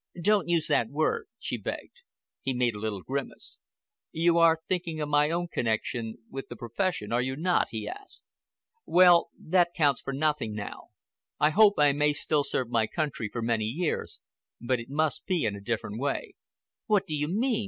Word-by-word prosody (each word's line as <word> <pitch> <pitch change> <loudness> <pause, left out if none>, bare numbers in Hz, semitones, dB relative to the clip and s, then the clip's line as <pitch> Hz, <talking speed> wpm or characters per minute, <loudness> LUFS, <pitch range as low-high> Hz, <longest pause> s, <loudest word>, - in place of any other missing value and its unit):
"Don't 200 +1 +2
use 170 -2 +2
that 115 - +2
word," 280 - 0
she - - -4
begged. 485 - -6 0.4
He 135 -1 -2
made 125 -2 +1
a 105 - -7
little 105 -3 -3
grimace. 140 +1 -5 0.5
"You 170 +1 +3
are 165 -1 +5
thinking 170 -3 -2
of 150 -1 -2
my 150 0 +3
own 175 +1 -1
connection 115 -2 -2
with 135 0 -7
the 120 - -8
profession, 120 - -2
are 120 +1 +2
you 130 +1 -2
not?" 175 +5 +1
he 110 -2 -5
asked. 405 - -9 0.6
"Well, 175 -1 +6
that 175 0 +1
counts 145 -5 +2
for - - -4
nothing 140 -6 0
now. 105 -1 -7 0.5
I 150 +1 +4
hope 205 +3 +6
I 145 -1 +5
may 150 +1 +2
still 150 0 +1
serve 130 -3 -1
my 115 -2 +2
country 145 -8 -3
for 115 - -3
many 115 -2 +1
years, 155 +9 -2 0.4
but 125 +1 0
it 115 - -9
must 155 +2 -1
be 180 - +1
in 105 -2 -1
a 100 - -9
different 110 0 -3
way." 140 +1 -2 0.5
"What 210 -4 +3
do 155 - -3
you 150 0 -1
mean?" 225 - +1
145 Hz, 185 wpm, -28 LUFS, 120-170 Hz, 0.6 s, Well